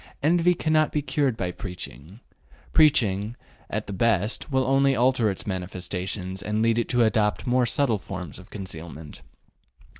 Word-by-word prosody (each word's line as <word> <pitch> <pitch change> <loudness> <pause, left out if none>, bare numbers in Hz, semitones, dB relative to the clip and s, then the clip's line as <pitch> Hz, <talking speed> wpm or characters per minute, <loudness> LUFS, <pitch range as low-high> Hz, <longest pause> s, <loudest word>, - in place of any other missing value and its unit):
Envy 175 +3 +4
cannot 155 -1 +2
be 150 - -1
cured 135 -3 0
by 90 -2 -2
preaching; 90 - -9 0.5
preaching, 110 -8 +3 0.3
at - - -3
the - - -6
best, 110 - +1
will 130 -1 +2
only 135 +1 +3
alter 125 -2 +3
its 95 - -4
manifestations 95 0 -4
and 105 +2 -1
lead 115 0 +3
it 120 - -2
to 120 -1 +3
adopt 110 -2 +1
more 125 0 +2
subtle 115 -4 +2
forms 90 -3 -7
of 95 - -14
concealment. 80 -5 -8
110 Hz, 150 wpm, -25 LUFS, 95-130 Hz, 0.5 s, Envy